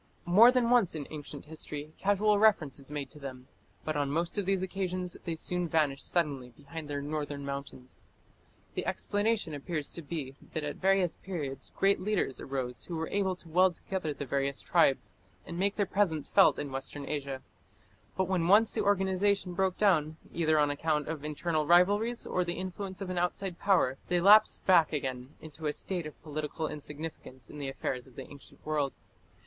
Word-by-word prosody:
More 210 +8 +8
than 245 -2 +2
once 235 -9 +4
in 150 -2 -4
ancient 145 -2 -8
history 150 -1 -7
casual 205 +1 +3
reference 185 -11 +3
is 140 - -13
made 145 -2 -5
to 150 - -11
them; 130 -2 -8 0.4
but 155 - -1
on 145 -1 0
most 165 +4 -1
of 205 -3 -1
these 195 -1 +1
occasions 185 -1 -3
they 165 - -2
soon 180 +2 -1
vanish 150 -4 +1
suddenly 145 -7 -1
behind 145 +5 -9
their 145 -1 -3
northern 145 -1 -4
mountains. 140 -2 -6 0.7
The - - -3
explanation 205 -4 0
appears 150 +1 -3
to 170 - -5
be 145 -4 -5 0.2
that 155 - -2
at 145 -1 -4
various 190 -2 +2
periods 150 -8 -5
great 195 0 +3
leaders 195 -9 -1
arose 130 -2 -4
who 175 - -5
were 160 0 -3
able 195 -2 0
to 175 - -14
weld 180 +2 +4
together 180 -4 -3
the 145 0 -5
various 140 +1 -1
tribes, 135 -11 +2 0.3
and 170 0 -6
make 200 +1 +1
their 205 - +1
presence 180 -6 +1
felt - - +6
in 145 -2 -4
Western 135 +2 -4
Asia. 140 -3 -3 0.7
But 190 -1 +1
when 180 -3 +1
once 210 +4 +6
the - - 0
organization 195 -1 +2
broke 190 0 0
down, 160 -7 +2 0.2
either 155 -2 +2
on 145 -1 +3
account 150 0 -1
of 155 -3 -4
internal 155 0 -1
rivalries 205 +7 +4
or 180 - 0
the 175 0 -3
influence 190 +1 -5
of 190 -2 -3
an 180 - 0
outside 180 0 -2
power, 160 -10 +2
they 180 - +2
lapsed 205 +4 +6
back 170 -5 +5
again 130 -1 -4
into 155 0 -6
a 150 - 0
state 175 -2 -3
of 155 - -12
political 155 +1 -3
insignificance 150 -4 -7
in 150 - -9
the 140 -2 -3
affairs 130 -1 -3
of 130 - -18
the - - -8
ancient 140 -1 -15
world. 150 -3 0
160 Hz, 185 wpm, -30 LUFS, 145-190 Hz, 0.7 s, More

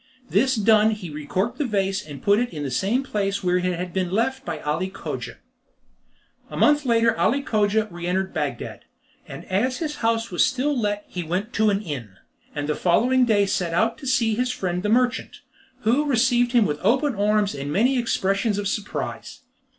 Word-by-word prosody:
This 260 +7 +3
done 215 0 +4
he 180 -6 -8
recorked 185 - -3
the 295 - +1
vase 195 -3 -1
and 145 -3 -10
put 205 +1 +4
it 245 0 0
in 150 -3 -5
the 135 - -3
same 205 - 0
place 200 -5 -2
where 180 0 +2
it 180 - -2
had 180 -1 -2
been 185 -2 -1
left 260 +7 0
by 160 - -4
Ali 160 +6 -1
Cogia. - - -6 1.1
A - - -7
month 295 -1 +4
later 230 -1 +3
Ali 275 +4 +2
Cogia 215 -2 +1
re 175 0 -6
entered 190 +1 -1
Bagdad, 145 -6 -3 0.5
and - - -9
as 250 +7 0
his 305 -3 -4
house 230 -1 0
was 175 - +3
still 265 +3 0
let 205 -3 -1
he 180 - -5
went 185 +8 -3
to 220 -1 +3
an 200 +1 0
inn; 125 - -6 0.4
and 145 -1 -3
the 150 - +1
following 245 +11 +3
day 205 -4 +3
set 175 -3 -1
out 225 +5 +1
to 270 - -7
see 240 -4 +2
his 250 +3 0
friend 180 -5 -2
the 210 - -1
merchant, 245 +2 0 0.4
who 245 +7 +2
received 245 -1 +2
him 235 -3 +5
with 150 -4 -2
open 265 +7 +2
arms 210 0 +1
and 140 +1 -5
many 245 - +2
expressions 200 -2 0
of 205 -1 -2
surprise. 205 +1 -4
210 Hz, 195 wpm, -23 LUFS, 180-240 Hz, 1.1 s, him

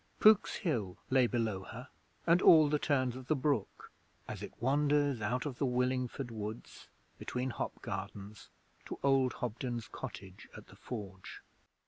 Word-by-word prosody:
Pook's 215 -1 +6
Hill 115 - -2
lay 130 -2 +5
below 115 -5 -1
her 125 +7 -9 0.4
and 170 +2 +5
all 155 -3 +8
the 150 0 +1
turns 130 -5 +1
of 130 -1 -9
the 155 - +3
brook 135 -6 -1 0.4
as - - -6
it - - -6
wanders 145 0 +2
out 125 +6 -1
of 135 -4 -5
the 140 - +2
Willingford 125 0 -1
Woods, 110 0 -7 0.3
between 125 +1 -3
hop - - -4
gardens, 100 +2 -6 0.4
to - - -5
old 135 -2 +3
Hobden's 120 0 -4
cottage 100 -7 -9
at - - -13
the - - -14
Forge. 100 -6 -8
125 Hz, 150 wpm, -33 LUFS, 110-140 Hz, 0.4 s, all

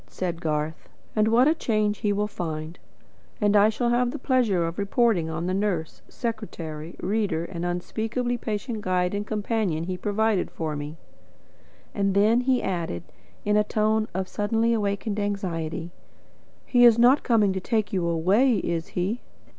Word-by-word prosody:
said 175 -2 -4
Garth. 155 0 -2 0.3
"And 215 0 +3
what 240 +4 +5
a 310 - +5
change 215 -8 0
he 210 - +1
will 205 +1 +1
find! 160 -4 -5 0.6
And 205 -1 +3
I 205 +1 +6
shall 235 +2 0
have 245 0 +2
the 295 - -4
pleasure 240 - +2
of 165 +3 -4
reporting 200 -4 +2
on 165 +1 -3
the 185 - -1
nurse, 190 -5 -2
secretary, 170 -9 -5
reader, 195 -6 -1
and 170 -1 -6
unspeakably 220 +7 -2
patient 220 0 -4
guide 180 -1 0
and 205 +1 -3
companion 210 -6 -1
he 180 +1 -3
provided 210 0 0
for 155 -2 -4
me." 145 +2 -6 1.0
Then 200 +3 +3
he 255 0 +1
added, 170 - -2 0.4
in 210 0 +2
a 210 - +4
tone 215 +1 +1
of 190 +1 -3
suddenly 225 +4 +1
awakened 205 0 -1
anxiety: 175 -5 -3 0.7
"He 245 -1 +4
is 235 -2 +8
not 250 +4 +5
coming 215 -5 +3
to 190 - -2
take 215 +1 -1
you 180 -3 0
away, 195 +10 +3
is 170 -3 -2
he?" 200 +7 -1
205 Hz, 160 wpm, -25 LUFS, 175-225 Hz, 1.0 s, is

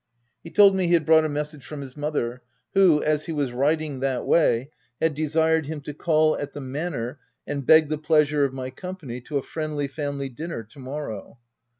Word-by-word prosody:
He 165 - -9
told 200 +1 +6
me 185 -2 +1
he 175 - +2
had 160 -3 +1
brought 160 0 +5
a - - -1
message 150 -1 -4
from 145 +2 -7
his 130 -2 -9
mother, 145 -5 -2 0.3
who, 185 -6 +5
as 155 0 0
he - - -3
was 145 -5 -1
riding 145 +2 0
that 130 -2 -1
way, 135 -4 +2 0.3
had 160 -1 +2
desired 160 +1 +1
him 155 0 -4
to 145 +1 -7
call 155 0 +2
at 145 0 -5
the - - -6
manor 135 -2 -4 0.3
and 140 -3 -4
beg 160 -1 +7
the 155 -1 -2
pleasure 150 -2 +3
of 140 - +1
my 130 -1 -5
company 145 -5 -7
to 145 +4 -3
a 135 - -2
friendly, 155 -3 -3
family 140 -1 -4
dinner 140 -1 -6
to 115 +6 -18
morrow. 130 -6 -6
150 Hz, 205 wpm, -24 LUFS, 135-160 Hz, 0.3 s, beg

